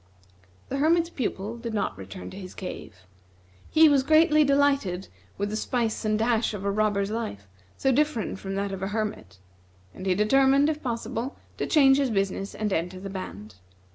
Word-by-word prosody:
The 275 - -2
Hermit's 335 +3 +2
Pupil 225 - -3
did 230 -1 -5
not 200 - -1
return 95 -1 -9
to - - -9
his 185 -2 -9
cave. 105 - -8 0.6
He 320 0 +6
was 285 -3 +4
greatly 310 +2 +5
delighted 275 -10 +1 0.3
with 205 +1 -2
the - - -2
spice 230 0 -1
and 215 -1 +1
dash 225 -1 +1
of 200 -1 -6
a 200 - +1
robber's 205 -1 0
life, 215 - -4 0.3
so 270 - +2
different 260 -8 0
from 195 0 -5
that 200 0 -2
of 195 -1 -5
a 190 - -1
hermit; 205 - -4 0.6
and 185 - -7
he 185 - +3
determined, 270 +7 +4
if 305 0 -6
possible, 235 +1 -4 0.2
to - - -2
change 270 -4 +5
his 275 -2 +1
business 195 -2 -2
and 210 -2 -1
enter 180 +2 -2
the 195 +1 -7
band. 105 - -8
215 Hz, 180 wpm, -26 LUFS, 195-270 Hz, 0.6 s, He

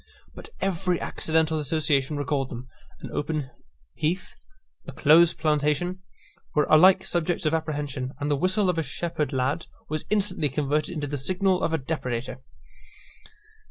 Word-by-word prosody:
But - - -8
every 180 -2 0
accidental 160 0 0
association 150 -1 0
recalled 140 -1 -1
them. 125 +1 -7 0.3
An - - -7
open 150 -2 -2 0.4
heath, 170 +5 -2 0.5
a - - -5
close 160 +3 +5
plantation, 155 +4 0 0.5
were 150 - +4
alike 185 +4 +7
subjects 175 -2 -1
of 155 - +2
apprehension; 145 -5 -2
and 145 0 -1
the - - +3
whistle 185 +6 +1
of 180 -2 +1
a - - +2
shepherd 160 +1 -3
lad 135 +4 -1 0.2
was 155 0 -3
instantly 190 -7 +1
converted 150 +4 -1
into 150 -2 -2
the 145 0 -3
signal 185 +5 +1
of - - 0
a 160 - +2
depredator. 130 -4 -4
155 Hz, 145 wpm, -26 LUFS, 145-170 Hz, 0.5 s, alike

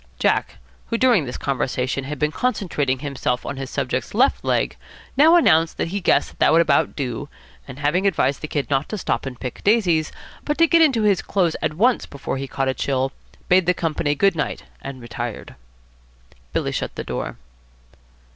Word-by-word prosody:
Jack, - - +1 0.3
who 230 - -1
during 240 - +4
this 125 - -5
conversation 130 0 -2
had 150 +2 -5
been 150 +3 0
concentrating 155 - -1
himself 130 -2 -2
on 140 - -4
his 135 -1 -5
subject's 130 +4 -3
left 260 +5 +3
leg, - - 0 0.4
now 310 +5 +6
announced 165 - +4
that - - -1
he 200 +3 -3
guessed - - +1
that - - +5
would 165 - +5
about 150 -4 +2
do, 135 +1 -4 0.4
and 135 -1 -9
having 150 +7 +1
advised 145 -7 +1
the 155 - -4
Kid 145 -2 -2
not 135 +1 +1
to 215 - -3
stop 175 - -2
and 125 -2 -7
pick 125 -2 -6
daisies, 180 -8 +2 0.3
but 295 - -1
to 330 - +6
get 335 0 +4
into 265 -9 +4
his 200 -3 +3
clothes 180 -5 0
at 155 - -1
once 240 +8 +2
before 140 -1 -5
he 135 +1 -4
caught 135 0 -2
a 130 - +1
chill, 135 0 -1 0.4
bade 185 -1 +4
the 180 - +3
company 155 -3 -1
good 195 +4 +3
night 150 - -3 0.2
and 135 -3 -8
retired. 120 -1 -6 1.0
Billy - - -1
shut - - -3
the - - -4
door. - - -4
150 Hz, 190 wpm, -22 LUFS, 135-195 Hz, 1.0 s, now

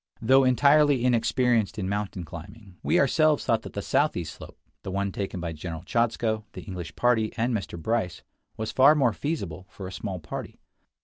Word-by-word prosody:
Though 130 +4 +5
entirely 140 0 +4
inexperienced 120 -2 +2
in 95 -3 -2
mountain 100 -2 -3
climbing, 95 +5 -11
we 175 - +2
ourselves 155 -4 +3
thought 115 -3 +2
that - - -10
the - - -4
southeast - - 0
slope, - - -12 0.2
the - - -6
one 100 +1 -1
taken 95 -1 -4
by 85 -1 -4
General 80 +1 -6
Chodzko, 110 0 0
the - - -8
English 90 -4 -7
party, 115 -3 +2
and 120 +2 +1
Mr. 95 -5 -4
Bryce, 110 -1 -2 0.3
was 110 0 -3
far 140 +4 +6
more 130 -7 +3
feasible 100 - -4
for 95 - -9
a - - -8
small 95 -1 -5
party. 75 - -7
110 Hz, 180 wpm, -26 LUFS, 95-125 Hz, 0.3 s, far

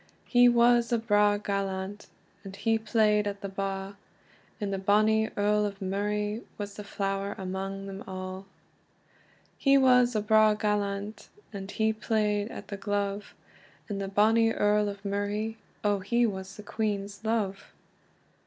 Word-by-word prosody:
He 245 -1 +6
was 240 0 +4
a 235 - +3
braw 205 -2 +3
gallant, 200 0 -3 0.4
And 195 -1 -9
he 225 +2 +1
playd 210 -1 +2
at 200 0 -4
the 200 - -4
ba; 195 0 -4 0.6
And 205 -2 -2
the 195 - -2
bonny 215 +3 +3
Earl 210 +1 +2
of 200 -1 -3
Murray, 210 +3 -2 0.2
Was 205 -1 -5
the 210 - -8
flower 195 0 -3
amang 195 +1 -4
them 195 0 -7
a'. 185 0 -6 1.2
He 275 -1 +5
was 250 -2 +5
a 215 - +2
braw 215 0 +5
gallant, 205 0 -2 0.2
And 195 -1 -6
he 220 +1 +1
playd 215 -1 0
at - - -9
the 200 - -5
glove; 205 0 -3 0.5
And 200 -2 -4
the 195 - -3
bonny 225 +3 +3
Earl 210 -1 +2
of 200 0 -9
Murray, 205 +2 -2 0.3
Oh 205 -1 +2
he 235 +5 +1
was 195 -2 -4
the 210 - -9
Queen's 205 -1 -3
love! 215 -3 -2
205 Hz, 150 wpm, -28 LUFS, 195-220 Hz, 1.2 s, He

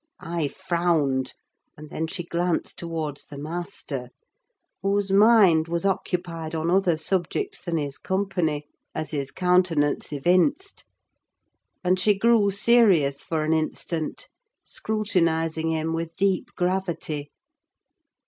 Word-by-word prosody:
I 165 -2 -2
frowned, 165 -7 0 0.4
and 150 0 -11
then 160 - -2
she 175 +2 -4
glanced 170 0 -1
towards 160 -4 -4
the 145 - -10
master: 150 -4 -5 0.7
whose 200 0 0
mind 195 -6 +6
was 170 +2 -2
occupied 175 -4 -2
on 160 +2 0
other 185 -3 +3
subjects 195 - -2
than 170 -2 -2
his 145 -2 -3
company, 180 -6 -1 0.3
as 155 0 -3
his 140 -3 -2
countenance 180 -6 +1
evinced; 185 - +1 1.0
and 180 0 +2
she 205 +2 +4
grew 225 -1 +4
serious 195 - +3
for 160 -2 -2
an 155 +1 +1
instant, 160 0 -2 0.4
scrutinizing 165 -7 0
him 160 0 -1
with 165 0 -4
deep 195 -2 +1
gravity. 175 -5 -2
170 Hz, 115 wpm, -25 LUFS, 155-190 Hz, 1.0 s, mind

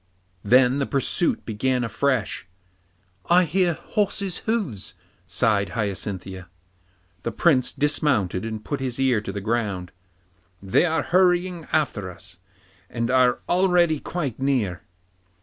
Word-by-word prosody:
Then 125 +4 +4
the 140 - -1
pursuit 140 +4 0
began 125 +3 0
afresh. 115 -2 -1 0.8
'I 180 +1 +6
hear 175 +1 +1
horses' 200 -2 -2
hoofs,' 175 - -2 0.3
sighed 100 +3 +1
Hyacinthia. 95 -3 -4 0.7
The 115 - -3
Prince 130 -1 +2
dismounted 135 -10 0
and 110 -1 -5
put 145 - -3
his 130 -1 -4
ear 130 -5 +2
to 100 - -5
the 100 - -5
ground. 100 -5 -2 0.7
'They 95 - +2
are 160 0 0
hurrying 180 -1 +2
after 115 -11 0
us, 90 0 -11 0.5
and 115 +1 -2
are 125 -1 +3
already 175 -4 +3
quite 145 -10 -4
near. 125 -10 0
125 Hz, 120 wpm, -24 LUFS, 105-160 Hz, 0.8 s, I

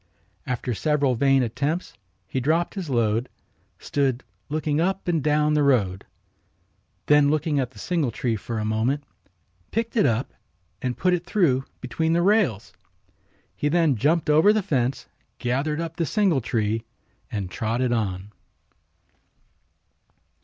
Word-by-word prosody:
After 125 -1 -2
several 145 +2 +1
vain 135 +2 +3
attempts 140 +9 -2 0.3
he 130 - -2
dropped 160 +6 +1
his 185 -6 -5
load, 115 -1 +1 0.5
stood 135 -3 -1 0.3
looking 155 0 0
up 190 +2 -1
and 165 -5 +1
down 150 0 +2
the 150 - +3
road. 105 -10 +1 1.0
Then 145 -1 +5
looking 155 -1 +1
at 130 -3 -1
the - - -20
singletree 125 -9 -1
for 115 +3 -5
a 105 - -2
moment 115 +7 0 0.7
picked 230 +2 -2
it 210 - +4
up 115 +3 -1 0.5
and 125 -1 -2
put 180 -1 +2
it 175 -1 0
through 145 -10 +1 0.2
between 160 +6 -1
the 170 +1 +2
rails. 130 - +2 0.8
He 145 - 0
then 165 -3 +3
jumped 150 +8 +1
over 155 +7 +6
the 215 -1 +1
fence, 135 -7 -1 0.3
gathered 140 +5 -1
up 165 0 -5
the 165 -3 0
singletree 120 - +1 0.5
and 100 -4 -4
trotted 120 +2 -1
on. 100 -3 -2
140 Hz, 135 wpm, -24 LUFS, 120-165 Hz, 1.0 s, over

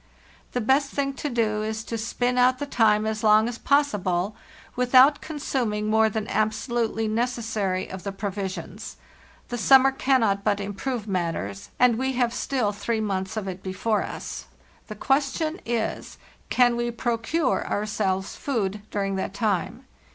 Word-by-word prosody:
The 245 - 0
best 270 +5 +2
thing 275 0 -1
to 295 - -1
do 220 -4 0
is 220 +1 -3
to 230 - -5
spin 245 +3 -1
out 250 +1 +4
the 290 - -3
time 215 -5 +3
as 220 0 -2
long 215 +1 +5
as 240 -1 -5
possible 205 -9 +1 0.4
without 255 +3 +5
consuming 250 -8 -2
more 220 +1 +3
than 215 0 -3
abso 215 +3 -1
lutely 225 -2 0
necessary 220 -5 -1
of 190 0 -7
the 200 - -4
provisions; 195 0 -5 0.5
the 240 -1 -3
summer 270 +3 +6
cannot 235 -7 +2
but 205 -1 +1
improve 205 +3 -4
matters, 165 - -3
and 245 -2 +4
we 265 0 0
have 245 -2 +1
still 245 -4 0
three 215 +2 -2
months 195 -1 -2
of 205 -3 -3
it 185 0 -5
before 200 +3 -1
us. - - -6 0.4
The 215 - -7
question 285 - 0
is, 235 -2 -2 0.3
can 245 -1 +4
we 240 0 -1
procure 240 +5 0
our 205 - -1
selves 195 -3 -1
food 210 -7 -2
during 195 -1 -2
that 190 +1 -4
time? 215 +3 -1
220 Hz, 160 wpm, -25 LUFS, 205-250 Hz, 0.5 s, summer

